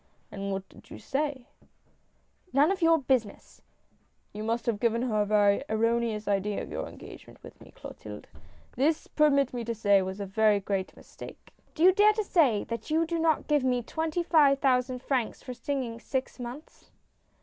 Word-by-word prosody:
" - - -40
And 200 0 -5
what 195 0 -4
did - - -18
you - - -9
say? 280 -2 -3 0.3
" - - -40
" 365 - -37
None 290 +6 +4
of 385 -2 -3
your 330 0 +5
business! 255 -7 -2 0.2
" - - -40
" - - -44
You 210 - -6
must 230 +2 -2
have 225 -4 -1
given 235 +1 +1
her 215 -4 0
a 205 - 0
very 205 +1 +3
erroneous 230 -1 0
idea 200 0 -1
of - - -10
your - - -4
engagement - - -13
with - - -14
me, - - -14
Clotilde. - - -10 0.5
This, 300 +4 +1
permit 280 -4 +2
me 240 -1 -3
to 230 0 -3
say, 205 -2 +3
was 190 +1 -5
a 200 - -3
very 210 +1 +2
great 195 -1 -3
mistake." - - -13
" - - -37
Do 320 - -1
you 370 - +8
dare 420 +2 +5
to 430 0 -1
say 285 - +2
that 230 +5 -6
you 320 +2 +2
do 335 0 -2
not 320 -2 +1
give 295 -3 +2
me 250 -2 +1
twenty 320 +6 -2
five 295 -5 +4
thousand 255 -1 0
francs 255 -5 -2
for 250 - -6
singing 250 -3 -4
six 260 +1 -4
months 245 +5 -10
250 Hz, 205 wpm, -28 LUFS, 215-300 Hz, 0.5 s, you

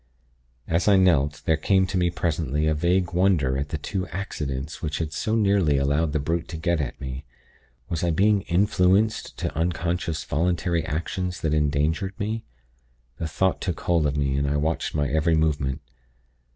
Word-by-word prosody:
"As 85 +3 0
I 100 -2 +6
knelt, 75 -6 +2
there 80 - +3
came 95 +3 +3
to 95 +1 -4
me 90 -1 +2
presently, 80 -3 -1
a 80 - +2
vague 85 +3 +1
wonder 85 -8 +2
at 70 +1 -2
the 80 - -2
two 95 +5 -3
'accidents' 75 -6 -5
which 75 -2 -2
had 80 -2 -3
so 110 - -1
nearly 100 -9 +3
allowed 70 +3 +1
the 75 - 0
brute 80 +4 -2
to 80 - -6
get 85 -1 0
at 65 -4 -5
me. 65 +1 -6 0.6
Was 85 -1 -3
I 85 - +2
being 100 +5 +3
influenced 95 +3 +2
to - - -3
unconscious 85 0 -1
voluntary 85 +2 0
actions 90 +4 -3
that 80 -1 0
endangered 75 +6 0
me? 110 +2 -2 0.8
The 80 - -2
thought 95 +4 0
took 90 -4 -3
hold 85 -4 +2
of 70 0 -2
me, 70 -2 0
and 70 0 0
I 75 - 0
watched 80 +2 -1
my 75 -2 +1
every 80 +4 +2
movement. 70 -4 0
80 Hz, 180 wpm, -25 LUFS, 75-90 Hz, 0.8 s, I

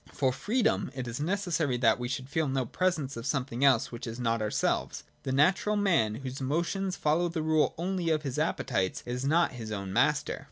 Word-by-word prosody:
For 130 -2 +1
freedom 205 - 0
it 130 -2 -4
is 120 +2 -4
necessary 165 -5 0
that 115 -1 +3
we 120 - -2
should 130 +1 -4
feel 155 +2 0
no 135 -1 0
presence 155 -2 -1
of 115 0 -6
something 135 -3 -1
else 130 -5 +4
which 120 +1 -6
is 115 +2 -6
not 115 -2 0
ourselves. 105 0 -1 0.2
The 130 - -3
natural 185 +9 +3
man, 170 - +2
whose 130 +2 -6
motions 170 +7 -1
follow 165 +3 +1
the 165 -2 -3
rule 155 -1 +2
only 180 0 -1
of 155 -1 +1
his 135 -4 -3
appetites, 95 -1 -1
is 125 +2 -3
not 165 +4 +3
his 115 -3 -7
own 100 -2 -4
master. 140 +6 +1
135 Hz, 200 wpm, -29 LUFS, 120-165 Hz, 0.2 s, else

